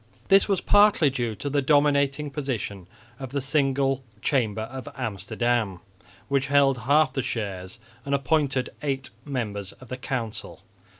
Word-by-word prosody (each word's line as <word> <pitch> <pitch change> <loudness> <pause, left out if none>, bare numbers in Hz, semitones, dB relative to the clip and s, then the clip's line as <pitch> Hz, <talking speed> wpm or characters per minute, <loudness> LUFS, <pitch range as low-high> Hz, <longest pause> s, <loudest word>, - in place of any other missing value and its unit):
This 195 0 +6
was 195 -3 +1
partly 205 -8 +5
due 120 -4 -2
to 145 - -6
the 145 0 +1
dominating 145 0 +2
position 115 - -4 0.3
of 130 -2 -6
the 140 +2 -2
single 135 -1 +1 0.2
Chamber 110 -5 0
of 130 +2 -7
Amsterdam, 110 -1 -1 0.5
which 140 0 +1
held 140 -2 +4
half 145 -2 +4
the 135 - 0
shares 95 -4 -4 0.3
and 140 0 0
appointed 140 -2 +1
eight 135 -3 -3
members 105 -8 -4
of 130 - -16
the 130 - -4
council. 125 -5 -5
135 Hz, 140 wpm, -25 LUFS, 120-140 Hz, 0.5 s, This